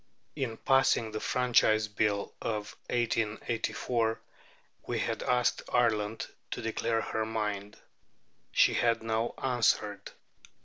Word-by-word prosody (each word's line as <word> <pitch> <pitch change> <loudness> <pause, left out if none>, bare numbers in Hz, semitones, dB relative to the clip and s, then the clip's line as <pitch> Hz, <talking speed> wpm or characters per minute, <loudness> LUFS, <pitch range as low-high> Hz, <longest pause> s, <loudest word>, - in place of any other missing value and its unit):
In 130 -6 -3
passing 135 -4 +3
the 110 - -3
Franchise 110 -4 +3
Bill 105 -1 0
of 105 -2 -3
1884, 115 0 0 0.7
we - - -1
had - - -1
asked 125 -1 +1
Ireland 110 -3 +1 0.2
to - - -4
declare 115 0 0
her 110 0 -2
mind. 105 -2 -3 0.7
She - - +5
had 115 -1 +2
now 115 +1 -1
answered. 110 -5 +1
110 Hz, 105 wpm, -30 LUFS, 105-120 Hz, 0.7 s, She